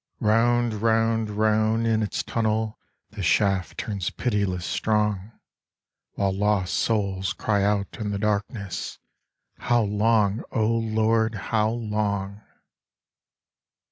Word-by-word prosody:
Round, 120 +2 +2
round, 115 -1 +2
round 110 +2 +1
in 110 -1 +2
its 105 - -2
tunnel 110 -1 -1 0.3
The 105 -2 -7
shaft 95 0 +1
turns 100 -4 -3
pitiless 100 -7 -1
strong, 105 -1 0 0.8
While 100 -1 0
lost 100 -2 +1
souls 100 -4 0
cry 100 -2 0
out 100 -1 0
in 105 -2 -2
the 100 - -2
darkness: 100 -1 -2 0.6
"How 120 -1 +2
long, 105 +1 +2
O 110 - +1
Lord, 110 0 +1
how 110 +1 0
long?" 105 -3 -2
105 Hz, 110 wpm, -25 LUFS, 100-110 Hz, 0.8 s, Round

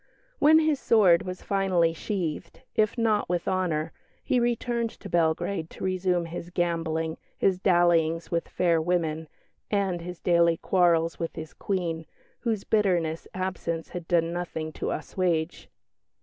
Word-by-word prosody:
When 310 +2 +7
his 310 -3 +2
sword 190 -10 +5
was 185 0 -6
finally 185 -4 +2
sheathed, 170 -2 -4
if 215 +2 +2
not 220 -4 +1
with 175 -1 -1
honour, 165 -4 0 0.3
he 250 - +2
returned 235 -1 0
to 200 - -11
Belgrade 170 +1 0
to - - -10
resume 185 -2 0
his 170 +1 -7
gambling, 165 -2 -1 0.2
his 190 -2 +2
dallyings 170 -3 +2
with 170 -1 -1
fair 170 -3 +2
women 160 -2 -1 0.4
and 195 -4 0
his 180 0 -7
daily 170 -1 +3
quarrels 170 -3 +2
with 165 - -4
his 160 -1 -7
Queen, 170 -5 -3 0.3
whose 225 -4 -1
bitterness 175 -7 +1
absence 175 -3 -3
had 175 -2 -7
done 170 -1 +2
nothing 165 -3 -4
to - - -4
assuage. 170 0 -2
175 Hz, 140 wpm, -27 LUFS, 165-190 Hz, 0.4 s, When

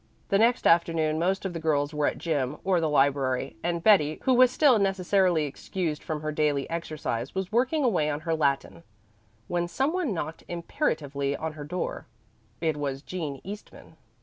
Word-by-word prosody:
The 200 - +3
next 235 +2 +3
afternoon 165 -2 +3
most 190 +3 0
of 190 - -2
the 165 - -4
girls 150 -2 0
were 150 -1 +1
at - - -1
gym 145 -4 -1
or 185 -3 +2
the 160 - +1
library, 135 -4 +1
and 170 -1 -2
Betty, 155 -8 +5
who 260 - +3
was 255 0 +6
still 255 -3 +4
necessarily 190 -4 +2
excused 155 +2 -4
from 155 -2 -4
her 155 - -1
daily 150 -2 0
exercise, 155 -7 -4
was 190 +1 -3
working 255 +7 +2
away 175 - +2
on 145 0 -3
her 165 +1 -1
Latin, 140 - 0 0.7
when 175 0 -1
some 270 - 0
one 360 -9 -1
knocked 165 -3 -4
imperatively 145 - -2
on 160 0 -4
her 150 -1 -8
door. 180 +5 -4 0.5
It 160 -3 0
was 140 -1 -3
Jean 155 -7 -5
Eastman. 205 +3 -10
160 Hz, 175 wpm, -27 LUFS, 150-190 Hz, 0.7 s, was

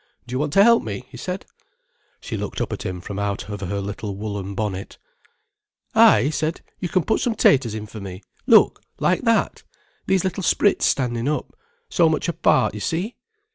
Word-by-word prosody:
"Do 125 - -9
you 130 - 0
want 150 0 -1
to 195 - +7
help 235 +1 +6
me?" 110 +3 -6
he - - -11
said. 185 0 -5 0.7
She - - -6
looked - - -4
up - - -2
at - - -5
him 90 -1 -4
from 100 +3 -6
out 100 0 -2
of 105 -1 -5
her 100 +1 -3
little 100 0 -5
woollen 100 -1 -5
bonnet. 100 -2 -4 1.0
"Ay," 105 - +6
he 145 - +1
said, 155 +2 -2 0.2
"you 180 - -3
can 185 -2 +1
put 220 - 0
some 240 -4 0
taters 130 - +3
in 110 -1 -5
for 110 +1 -9
me. 95 0 -8 0.2
Look—like - - +3
that—these 190 -2 -1
little 190 0 -2
sprits 200 +3 +2
standing 120 -2 0
up—so 460 - -1
much 155 - -1
apart, 170 -1 +2
you - - -6
see." 185 +9 -2
130 Hz, 180 wpm, -22 LUFS, -, 1.0 s, to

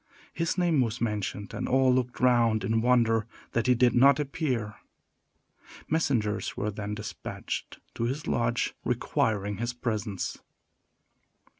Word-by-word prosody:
His 165 +2 -1
name 170 -6 +3
was 115 -1 -1
mentioned, 105 -2 -3
and - - -3
all 130 0 +4
looked 125 -1 -1
round 120 -4 +3
in 110 +3 +1
wonder 115 -3 +3 0.2
that 115 +1 0
he 125 - +5
did 120 0 +4
not 140 +3 +6
appear. 130 -7 -2 1.1
Messengers 125 -10 0
were 105 +1 -1
then 105 0 -4
despatched 105 0 -6 0.2
to 115 - -2
his 135 +5 -3
lodge 120 0 0
requiring 105 -2 0
his 120 +1 -2
presence. 110 -5 -3
120 Hz, 130 wpm, -28 LUFS, 105-130 Hz, 1.1 s, not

